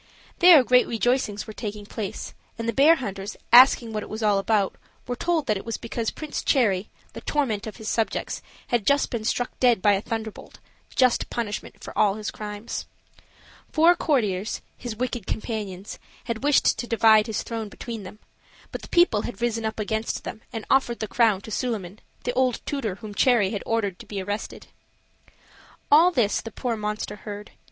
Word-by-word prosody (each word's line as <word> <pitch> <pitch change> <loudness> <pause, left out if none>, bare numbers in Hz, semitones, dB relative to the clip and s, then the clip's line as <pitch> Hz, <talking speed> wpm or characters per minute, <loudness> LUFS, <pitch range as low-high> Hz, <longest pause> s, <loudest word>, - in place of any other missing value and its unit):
There 345 -6 +9
great 250 0 +4
rejoicings 235 -2 0
were 215 - -8
taking 210 -2 -6
place, 205 -1 -6 0.2
and 230 0 -4
the 230 - 0
bear 295 +8 +6
hunters, 200 -8 -5 0.2
asking 245 -2 +7
what 215 - -2
it - - -9
was 220 +1 -5
all 205 -2 +3
about, 200 -1 +1 0.3
were 245 - -3
told 330 +2 0
that 215 -4 +1
it - - -7
was 230 - -4
because 230 -1 -3
Prince 305 -1 -5
Cherry, 210 -7 +2 0.2
the - - -8
torment 235 -8 -1
of 215 - -7
his 220 -2 -9
subjects, 225 0 -1 0.3
had 235 -4 0
just 280 0 +3
been 235 -4 -3
struck 245 +2 -1
dead 245 -4 +4
by 205 +2 +4
a 195 - 0
thunderbolt 220 -1 -6 0.4
just 255 -2 +3
punishment 215 -3 -4
of - - -7
all 205 -2 +3
his 215 0 -4
crimes. 210 +1 -6 0.8
Four 335 +2 +5
courtiers, 215 - 0
his 240 -3 -6
wicked 240 -2 -3
companions, 210 -4 -4 0.2
had 230 +1 -4
wished 290 0 +3
to 240 - -3
divide 220 -1 +5
his 220 - -2
throne 225 -2 -5
between 230 +1 -7
them; 195 +2 -10 0.5
but - - -6
the - - -10
people 345 -12 +4
had 240 - -6
risen 230 -2 -1
up 220 0 -3
against 220 +1 -2
them 220 - -7
and 225 -2 -5
offered 265 -3 +2
the 220 - -3
crown 220 -4 +2
to 220 - -10
Suliman, 210 -5 -3 0.2
the 245 - -1
old 255 -2 +1
tutor 245 -10 -2
whom 215 0 -9
Cherry 210 -3 +3
had 205 - -3
ordered 205 -5 -1
to - - -12
be 205 - -4
arrested. 205 +3 -5 1.3
All 320 +5 +8
this 240 - +1
the 225 - -7
poor 240 +1 -3
monster 210 -1 -4
heard. 205 0 -8
225 Hz, 185 wpm, -25 LUFS, 210-245 Hz, 1.3 s, There